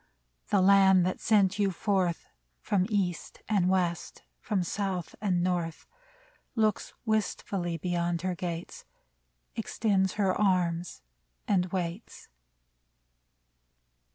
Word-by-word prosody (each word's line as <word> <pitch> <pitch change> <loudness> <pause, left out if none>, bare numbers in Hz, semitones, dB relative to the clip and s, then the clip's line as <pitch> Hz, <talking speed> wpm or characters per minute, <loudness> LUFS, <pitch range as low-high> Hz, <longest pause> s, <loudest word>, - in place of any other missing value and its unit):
The 200 - +3
Land 190 -2 +6
that 185 - -2
sent 205 -2 +3
you 200 -1 +3
forth 185 -2 0 0.3
From 190 -2 0
East 190 -6 -2
and 195 -4 +2
West, 175 -3 -1 0.2
from 205 -6 -1
South 190 -1 -3
and 180 -4 +1
North, 175 -3 -2 0.7
Looks 215 -3 0
wistfully 195 -5 -1
beyond 170 0 -1
her 185 -1 0
gates. 175 -1 -5 0.7
Extends 195 -4 0
her 195 -3 +1
arms 180 -4 0 0.4
and 185 -3 +2
waits 180 +3 -5
185 Hz, 100 wpm, -29 LUFS, 175-200 Hz, 0.7 s, Land